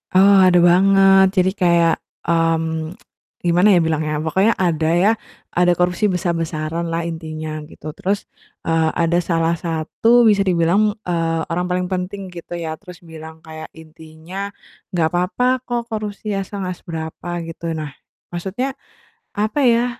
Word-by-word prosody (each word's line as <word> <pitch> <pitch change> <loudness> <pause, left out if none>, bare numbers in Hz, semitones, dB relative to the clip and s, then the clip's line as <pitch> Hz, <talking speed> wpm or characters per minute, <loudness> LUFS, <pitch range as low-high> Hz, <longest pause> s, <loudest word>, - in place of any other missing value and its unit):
Eee, 195 +1 +7
ada 180 - +4
banget. 195 +2 +6
Jadi 185 +1 +4
kayak, 170 -4 +3 0.3
mmm, 165 0 0 0.5
gimana 175 +3 +4
ya 180 - +5
bilangnya, 155 -2 0
pokoknya 190 +8 +2
ada 165 -4 +1
ya, 195 +5 +4 0.4
ada 180 0 +3
korupsi 180 +3 +1
besar-besaranlah 165 -1 -2
intinya 155 -2 -5
gitu. 155 0 -9
Terus, 200 +2 -2 0.4
eee, 165 -1 +2
ada 170 +1 +1
salah 165 -1 0
satu 170 +9 +2
bisa 210 -3 +4
dibilang, 190 +4 +2
eee, 165 -2 0
orang 180 +2 -2
paling 180 0 0
penting 190 +2 -4
gitu 175 0 -7
ya, 160 -2 -4
terus 180 -3 -12
bilang 160 -1 -10
kayak 155 0 -9
intinya, 160 +4 -8 0.4
"Nggak 170 -3 +2
apa-apa 180 +8 0 0.2
kok 240 -1 -2
korupsi 210 0 -4
asal 195 0 -4
nggak 180 -1 -4
seberapa," 160 +1 -6 0.2
gitu. 165 0 -6
Nah, 150 -3 -5 0.4
maksudnya, 200 +10 -3 0.6
apa 215 +7 0
ya 235 +1 +3
175 Hz, 140 wpm, -20 LUFS, 160-195 Hz, 0.6 s, Eee